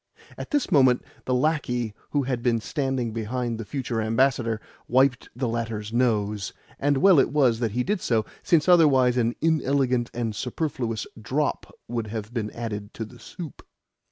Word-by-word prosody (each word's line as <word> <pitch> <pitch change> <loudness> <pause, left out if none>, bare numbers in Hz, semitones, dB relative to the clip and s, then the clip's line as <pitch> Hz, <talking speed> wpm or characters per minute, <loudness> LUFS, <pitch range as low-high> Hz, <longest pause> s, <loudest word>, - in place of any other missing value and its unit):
At - - -7
this 290 -3 0
moment 130 -4 +5 0.2
the 130 - 0
lacquey 125 -6 0 0.2
who 145 -1 +1
had 125 -2 -2
been 120 -1 +2
standing 130 -2 -2
behind 115 +1 -2
the 115 - -5
future 125 -3 -2
ambassador 115 0 +1 0.3
wiped 130 0 +2
the 125 0 -1
latter's 115 -2 -3
nose; 105 -5 0 0.3
and 145 0 +2
well 185 +1 +6
it - - +3
was 130 -6 +3
that 115 -4 -1
he 125 +1 +1
did 205 +2 -1
so, 110 -3 +1 0.2
since 165 -2 +3
otherwise 140 -8 +5
an 120 -1 +1
inelegant 135 -6 +1
and 115 -3 -3
superfluous 120 -2 -2 0.2
drop 140 +7 -1 0.2
would 115 -2 -3
have 110 +1 -6
been 110 -3 -2
added 105 -3 -6
to 110 - -4
the 110 - -15
soup. 170 -6 -9
125 Hz, 165 wpm, -25 LUFS, 115-135 Hz, 0.3 s, well